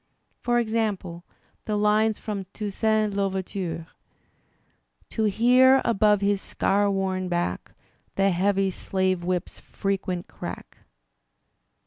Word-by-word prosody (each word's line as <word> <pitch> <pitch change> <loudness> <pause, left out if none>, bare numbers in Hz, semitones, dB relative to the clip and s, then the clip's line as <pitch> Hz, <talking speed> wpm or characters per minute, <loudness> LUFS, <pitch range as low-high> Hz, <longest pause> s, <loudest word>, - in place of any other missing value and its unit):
Por 240 0 +1
example 215 -7 -1 0.4
the 210 -1 -1
lines 210 +1 +2
from 200 -3 -5
"Toussaint 215 +1 0
L'Ouver^ 195 -1 -1
ture'*: 165 -5 -4 1.3
To 220 - -1
hear 250 +5 +5
above 210 -2 +3
his 200 -1 +1
scar 205 +1 +1
worn 190 -1 -1
back 175 - -2 0.4
The 195 0 +3
heavy 195 +2 +1
slave 185 -1 -1
whip's 180 -1 -3
frequent 195 -3 -3
crack. - - -8
200 Hz, 105 wpm, -25 LUFS, 185-215 Hz, 1.3 s, hear